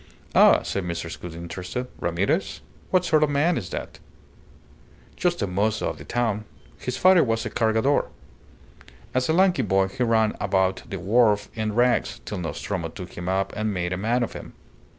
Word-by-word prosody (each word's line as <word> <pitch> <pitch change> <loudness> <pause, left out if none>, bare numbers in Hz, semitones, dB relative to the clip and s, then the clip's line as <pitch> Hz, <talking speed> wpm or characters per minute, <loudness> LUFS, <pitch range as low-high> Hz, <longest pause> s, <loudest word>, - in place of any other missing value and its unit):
"Ah!" - - +6
said 100 - -2
Mrs. 85 -1 -5
Gould, 85 -2 -7
interested. 90 +8 -5
"Ramirez? 95 - -1 0.3
What 185 -1 +2
sort 155 -3 +3
of 150 - +3
man 150 +5 +2
is 90 - -4
that?" - - -6 1.2
"Just 175 - 0
a - - +2
mozo 100 +4 0
of - - -7
the - - -8
town. 110 -3 -1 0.3
His 125 0 -4
father 185 +2 +6
was 115 -1 -1
a 110 - -4
Cargador. 110 +5 +2 1.1
As 130 +2 0
a - - +3
lanky 180 -4 +4
boy 95 -3 +2
he 95 - -7
ran 110 -2 +2
about 95 -1 +1
the 95 - -4
wharf 105 +2 +2
in 110 -2 -2
rags, 120 0 +2
till 105 - -4
Nostromo 85 +1 -3
took 90 +3 -9
him 90 +1 -4
up 95 +1 0
and 110 -1 -1
made 90 0 -1
a - - 0
man 115 +5 +1
of - - -4
him. - - -9
110 Hz, 180 wpm, -24 LUFS, 95-125 Hz, 1.2 s, Ah